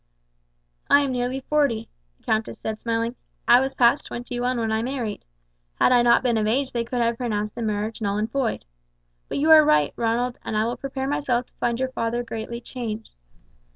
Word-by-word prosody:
"I 285 Hz, -, +7 dB
am 280 Hz, -2 st, -1 dB
nearly 250 Hz, +1 st, -2 dB
forty," 270 Hz, -6 st, +1 dB, 0.3 s
the -, -, -34 dB
countess 220 Hz, 0 st, -1 dB
said 215 Hz, -1 st, -4 dB
smiling. 230 Hz, +1 st, -1 dB, 0.3 s
"I 240 Hz, -, +8 dB
was 270 Hz, +1 st, -2 dB
past 245 Hz, +4 st, +3 dB
twenty 245 Hz, 0 st, -5 dB
one 250 Hz, +1 st, 0 dB
when 225 Hz, -1 st, -1 dB
I 220 Hz, 0 st, +1 dB
married. 240 Hz, -4 st, -3 dB, 0.5 s
Had -, -, +3 dB
I 245 Hz, -1 st, +6 dB
not 240 Hz, +1 st, +4 dB
been 240 Hz, -3 st, +2 dB
of 215 Hz, -, 0 dB
age 260 Hz, +4 st, 0 dB
they 235 Hz, -1 st, -1 dB
could 240 Hz, +1 st, -2 dB
have 230 Hz, 0 st, +1 dB
pronounced 210 Hz, -4 st, -2 dB
the 240 Hz, -, -6 dB
marriage 215 Hz, 0 st, -2 dB
null 200 Hz, -1 st, 0 dB
and 215 Hz, +2 st, -2 dB
void. 265 Hz, -, -1 dB, 0.6 s
But -, -, -3 dB
you 310 Hz, +3 st, +3 dB
are 310 Hz, -1 st, +9 dB
right, 150 Hz, -, +3 dB
Ronald, 240 Hz, +2 st, -1 dB
and 215 Hz, -, -2 dB
I 215 Hz, -, +2 dB
will 240 Hz, +2 st, -2 dB
prepare 270 Hz, -1 st, -4 dB
myself 255 Hz, -4 st, 0 dB
to -, -, -26 dB
find 235 Hz, 0 st, 0 dB
your 260 Hz, 0 st, 0 dB
father 235 Hz, 0 st, -2 dB
greatly 230 Hz, 0 st, -5 dB
changed. 230 Hz, -3 st, -6 dB
240 Hz, 205 wpm, -24 LUFS, 225-255 Hz, 0.6 s, are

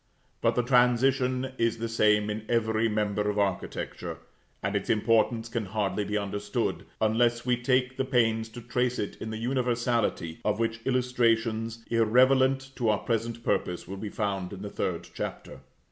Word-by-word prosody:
But -, -, +2 dB
the 125 Hz, -, +2 dB
transition 125 Hz, +1 st, +3 dB
is 115 Hz, -1 st, +1 dB
the 115 Hz, +1 st, -3 dB
same 105 Hz, -2 st, +3 dB
in 105 Hz, +1 st, -4 dB
every 110 Hz, -1 st, +2 dB
member 105 Hz, -1 st, 0 dB
of 105 Hz, -, -2 dB
architecture; 100 Hz, -2 st, -2 dB, 0.5 s
and -, -, -1 dB
its -, -, -2 dB
importance 115 Hz, +1 st, +2 dB
can 115 Hz, -2 st, -3 dB
hardly 105 Hz, +1 st, -1 dB
be 105 Hz, +1 st, -1 dB
understood, 100 Hz, 0 st, -2 dB
unless 120 Hz, +2 st, +2 dB
we 125 Hz, -1 st, +3 dB
take 125 Hz, +1 st, +1 dB
the -, -, +1 dB
pains 115 Hz, -4 st, +1 dB
to -, -, -6 dB
trace 125 Hz, +1 st, 0 dB
it 105 Hz, -, -3 dB
in 110 Hz, -, -4 dB
the 110 Hz, -, -4 dB
universality, 120 Hz, -8 st, 0 dB
of 105 Hz, 0 st, +1 dB
which 115 Hz, 0 st, -1 dB
illustrations, 115 Hz, -3 st, +1 dB
irrelevant 130 Hz, +4 st, +4 dB
to 120 Hz, -3 st, +1 dB
our 105 Hz, -, +3 dB
present 115 Hz, +1 st, -2 dB
purpose, 90 Hz, -6 st, -1 dB
will 95 Hz, -, -5 dB
be 105 Hz, +1 st, -5 dB
found 100 Hz, -3 st, -2 dB
in 100 Hz, 0 st, -8 dB
the 105 Hz, -, -6 dB
third 85 Hz, -2 st, -3 dB
Chapter. -, -, -6 dB
115 Hz, 165 wpm, -28 LUFS, 105-125 Hz, 0.5 s, irrelevant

